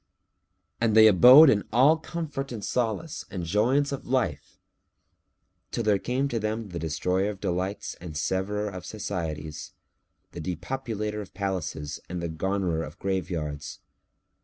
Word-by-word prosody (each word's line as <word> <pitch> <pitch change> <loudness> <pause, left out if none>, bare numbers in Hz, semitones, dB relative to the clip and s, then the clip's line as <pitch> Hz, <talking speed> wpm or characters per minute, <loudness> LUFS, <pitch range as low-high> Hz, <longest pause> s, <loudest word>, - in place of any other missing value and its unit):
And 115 -2 +2
they 110 0 +9
abode 125 - +9
in 105 -1 +1
all 135 +7 +6
comfort 155 -4 -5
and 110 -4 -5
solace 125 +6 -2
and 95 -5 -5
joyance 125 - +2
of 140 - -5
life, 120 - -1 1.1
till 120 - -2
there 105 -2 +3
came 130 +6 -1
to 115 - -1
them 110 0 -3
the 85 -2 -5
Destroyer 90 +5 0
of 100 -2 -6
delights 95 +3 -2
and 80 -4 -6
Severer 100 +5 -1
of 90 -3 -6
societies; 80 -8 -5 0.6
the - - -7
Depopulator 105 - -4
of 100 - -12
palaces 90 -6 -3
and 90 0 -4
the 85 -1 -3
Garnerer 90 0 -1
of 80 +3 -9
graveyards. 80 -7 -3
100 Hz, 140 wpm, -27 LUFS, 85-115 Hz, 1.1 s, they